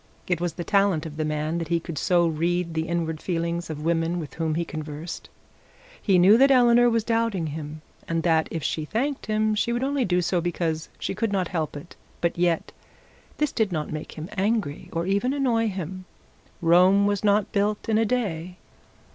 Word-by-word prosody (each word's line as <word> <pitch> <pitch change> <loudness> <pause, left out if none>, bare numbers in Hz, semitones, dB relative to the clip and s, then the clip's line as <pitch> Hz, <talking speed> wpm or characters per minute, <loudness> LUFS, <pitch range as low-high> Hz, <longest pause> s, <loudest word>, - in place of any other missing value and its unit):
It 175 -2 -1
was 175 -2 -1
the 175 - -5
talent 195 -5 +2
of 155 -2 -7
the 155 - 0
man 155 +2 -1
that 165 - -4
he 170 +1 +1
could 165 -1 -7
so 175 -2 +3
read 170 +1 0
the 160 0 -2
inward 165 -2 -2
feelings 170 -1 -2
of 150 -1 -5
women 165 +1 +1
with 155 -4 -7
whom 160 -2 -1
he 170 +1 -1
conversed. 155 +1 -7 0.7
He 195 -4 +3
knew 195 +6 +6
that 275 +1 +6
Eleanor 245 -2 +5
was 230 -1 +1
doubting 225 -6 0
him, 155 0 -6 0.2
and 165 -1 -1
that 160 -2 +2
if 165 -3 -4
she 155 - -1
thanked 260 - -2
him 215 0 +1
she 215 +3 0
would 240 +2 -1
only 275 0 +1
do 180 -4 +1
so 175 0 +1
because 165 -2 -2
she - - -3
could 225 -3 -1
not 185 -3 0
help 155 -4 -2
it; 145 +4 -11 0.2
but 170 - 0
yet 170 -1 0 0.7
this 300 -1 0
did 220 -4 0
not 155 -2 -3
make 155 - -6
him 160 +1 -7
angry 200 -6 -1
or 165 +1 -2
even 200 +7 +1
annoy 240 -5 +1
him. 185 -1 -5 0.6
Rome 180 +4 +5
was 205 -1 0
not 205 -1 +2
built 210 0 0
in 220 -1 +2
a - - +3
day. 185 -7 -2
175 Hz, 200 wpm, -25 LUFS, 165-215 Hz, 0.7 s, knew